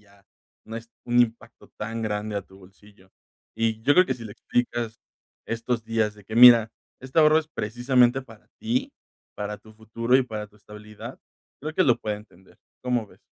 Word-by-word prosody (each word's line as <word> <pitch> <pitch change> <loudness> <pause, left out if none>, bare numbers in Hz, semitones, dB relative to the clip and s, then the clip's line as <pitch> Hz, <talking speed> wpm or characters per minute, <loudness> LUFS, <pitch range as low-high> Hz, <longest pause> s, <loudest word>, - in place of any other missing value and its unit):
ya 100 -1 -24 0.4
no 115 - -6
es 115 0 -9 0.2
un 120 0 +4
impacto 115 -1 -2
tan 115 +1 -4
grande 105 -1 -2
a 100 - -2
tu 95 +1 -19
bolsillo. 100 0 -20 0.5
Y 115 -1 0
yo 145 +5 +4
creo 185 - +7
que - - -1
si 115 - -10
le 105 - -8
explicas 120 0 -2 0.5
estos 115 0 -2
días 110 -2 0
de 105 -1 -17
que: 110 +3 -6
"Mira, 120 -2 +9 0.3
este 130 +4 -3
ahorro 155 0 +6
es 160 -1 -5
precisamente 125 +1 +2
para 115 -4 -17
ti, 255 +5 -1 0.4
para 105 0 -4
tu 110 - -17
futuro 115 +3 -2
y 135 - +3
para 110 -4 -6
tu 105 - -24
estabilidad", 105 0 -11 0.4
creo 155 +1 -4
que 185 - +3
lo 120 - +4
puede 105 -1 -3
entender, 100 -3 -18 0.2
¿cómo 125 -3 0
ves? - - -22
115 Hz, 190 wpm, -25 LUFS, 105-125 Hz, 0.5 s, Mira